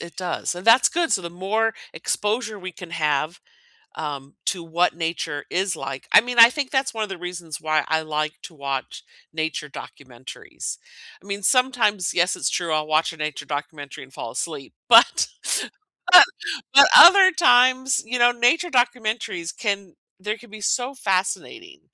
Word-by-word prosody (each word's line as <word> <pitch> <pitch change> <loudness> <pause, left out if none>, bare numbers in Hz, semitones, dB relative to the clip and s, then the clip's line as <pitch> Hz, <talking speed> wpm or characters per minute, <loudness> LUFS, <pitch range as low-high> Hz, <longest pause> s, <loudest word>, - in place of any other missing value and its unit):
it 170 - -11
does, 180 -1 -4
and 180 +4 -10
that's 230 +3 +6
good 335 -1 -1
so 185 - 0
the 170 - -7
more 215 +5 -2 0.2
exposure 215 0 -3
we 185 -1 -8
can 175 0 -12
have, 155 0 -2 0.6
um, 140 -2 -7
to 180 -3 -2
what 165 +1 0
nature 165 -3 -4
is 185 0 -1
like 135 -2 -7
I - - +8
mean, 245 +1 -6
I 230 0 +9
think 280 0 -4
that's 265 -2 -1
one 220 - -3
of 210 - -3
the 190 -2 -7
reasons 175 -3 -8
why 155 -1 0
I 160 0 0
like 155 0 -3
to 165 - -12
watch 140 -2 -6 0.3
nature 155 -1 -4
documentaries. 130 -3 -10 0.4
I - - -20
mean, 200 0 -5
sometimes, 235 -7 +1
yes, 180 +1 +1
it's - - -2
true 170 -3 -2
I'll 155 0 -1
watch 155 +1 0
a - - -13
nature 150 -2 -5
documentary 145 -1 -7
and 135 - -20
fall 115 - -7
asleep, 155 -2 -6
but - - +5 0.8
but - - +11 0.5
but 280 - +9
other 375 +1 +9
times, 255 -2 +3
you 245 +1 -3
know, 240 0 +5
nature 290 +9 +1
documentaries 235 - -2
can 200 -5 -4 0.3
they 210 +3 -4
can 240 0 -18
be 215 0 -11
so 250 +6 -2
fascinating 205 - -3
185 Hz, 170 wpm, -22 LUFS, 155-240 Hz, 0.8 s, but